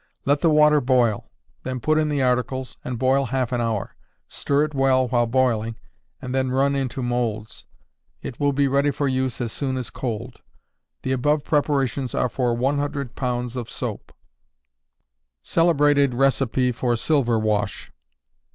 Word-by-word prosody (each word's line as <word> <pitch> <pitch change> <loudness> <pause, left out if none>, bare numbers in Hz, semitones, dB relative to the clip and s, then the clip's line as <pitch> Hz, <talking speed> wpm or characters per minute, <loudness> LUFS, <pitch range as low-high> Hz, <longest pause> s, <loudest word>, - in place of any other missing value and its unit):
Let 145 +1 +2
the 165 - +4
water 150 -1 +5
boil; 120 -4 +1 0.3
then 130 -1 -4
put 155 +6 +2
in 155 -1 +1
the 145 -2 0
articles, 125 +1 -1
and 125 -2 -4
boil 130 +3 +2
half 130 -1 -1
an 120 -1 0
hour. 115 -4 -2 0.3
Stir 140 +1 0
it 155 0 -3
well 135 -1 +2
while 120 -1 +1
boiling, 115 -2 +1 0.4
and 125 - -6
then 130 -1 0
run 135 +2 +1
into 130 -1 -2
moulds. 115 -3 -3 0.6
It 120 - -7
will 145 -1 +2
be 140 0 +2
ready 140 +2 +2
for 145 0 -1
use 130 -1 -1
as 120 -3 -2
soon 130 +1 -2
as 125 - -5
cold. 115 -5 -5 0.6
The 130 - -2
above 145 +3 +1
preparations 140 -4 0
are 125 - +1
for 120 -1 0
100 140 0 -2
pounds 125 -1 -2
of 120 -3 -5
soap. - - -5 1.3
_Celebrated 145 -6 +3
Recipe 130 -2 +2
for 120 0 0
Silver 120 -1 +1
Wash. 105 -1 -1
130 Hz, 155 wpm, -23 LUFS, 120-140 Hz, 1.3 s, water